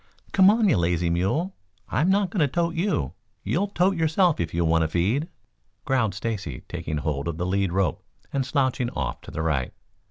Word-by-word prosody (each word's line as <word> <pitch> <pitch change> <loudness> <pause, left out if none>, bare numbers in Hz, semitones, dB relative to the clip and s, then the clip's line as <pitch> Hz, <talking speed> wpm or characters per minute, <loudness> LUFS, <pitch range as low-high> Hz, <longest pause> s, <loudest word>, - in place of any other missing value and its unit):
"Come 190 0 +6
on, 220 0 +4
you 145 - +4
lazy 85 0 +1
mule. 125 - 0 0.3
I'm 160 +6 +2
not 195 -1 +2
going 200 - -2
to 150 - +4
tote 170 +4 0
you. 170 - -1 0.3
You'll 200 +4 0
tote 190 -1 +2
yourself 165 +1 +2
if 80 -2 -1
you 85 0 0
want 80 0 +3
a - - +1
feed," 100 - 0 0.6
growled 120 -8 +1
Stacy, 95 - -4
taking 75 0 -4
hold 75 0 -2
of 85 -2 -3
the 90 - -2
lead 95 0 0
rope 95 -5 0 0.3
and 135 -1 +1
slouching 130 -2 0
off 65 - -4
to - - -11
the 80 - -3
right. 70 -6 0
115 Hz, 195 wpm, -25 LUFS, -, 0.6 s, Come